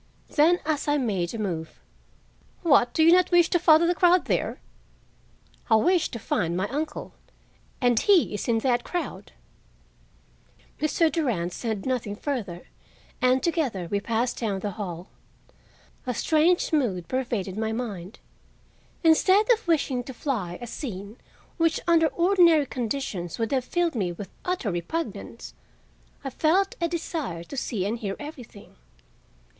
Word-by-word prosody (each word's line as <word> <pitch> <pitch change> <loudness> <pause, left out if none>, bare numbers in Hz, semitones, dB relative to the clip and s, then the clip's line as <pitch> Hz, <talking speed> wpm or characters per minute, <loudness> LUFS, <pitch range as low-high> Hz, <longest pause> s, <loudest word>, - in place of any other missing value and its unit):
Then, 330 +4 +4
as 305 -2 -1
I 290 0 +3
made 195 -10 -1
a - - -3
move, 170 -7 -4 0.8
"What 275 -7 +3
you 320 +1 +6
do - - +8
not 365 0 +3
wish 345 -2 +4
to 350 - +3
follow 320 -1 +6
the 350 - +3
crowd 355 0 +4
there?" - - -1 1.1
"I 220 - +6
wish 340 +8 +3
to 235 - -6
find 175 -6 -1
my 190 +2 0
uncle, 300 +3 -4 0.7
and 245 -3 +3
he 385 - +4
is 210 - -4
in 230 -2 +2
that 240 -2 +2
crowd." 295 - -5 1.5
Mr. 310 +1 +2
Durand 215 - -1
said 220 -3 -4
nothing 245 -6 -2
further, 210 - -4 0.6
and 255 +1 +3
together 270 - -1
we 200 - +1
passed 230 +4 -1
down 205 -5 -2
the 205 - -3
hall. 180 -2 -6 1.0
A 250 - -1
strange 320 - +2
mood 200 - 0
pervaded 235 -7 -2
my 220 +1 -2
mind. 215 -5 -5 0.9
Instead 375 +7 +5
of 450 -4 +1
wishing 280 -6 +1
to 265 - -8
fly 205 - -3
a 240 - -6
scene 215 -3 -7 0.4
which 330 -2 +2
under 330 -1 +5
ordinary 340 -1 +4
conditions 230 -9 -4
would 225 -1 -2
have 260 -2 0
filled 345 +3 0
me 195 -8 -1
with 190 +3 -8
utter 360 - -1
repugnance, 175 - -5 0.7
I 270 - -4
felt 365 +9 +2
a 340 - +2
desire 315 - -4
to 170 - -9
see 220 -7 -2
and 225 +3 -2
hear 195 -3 -3
everything. 255 - -11
255 Hz, 150 wpm, -26 LUFS, 205-325 Hz, 1.5 s, do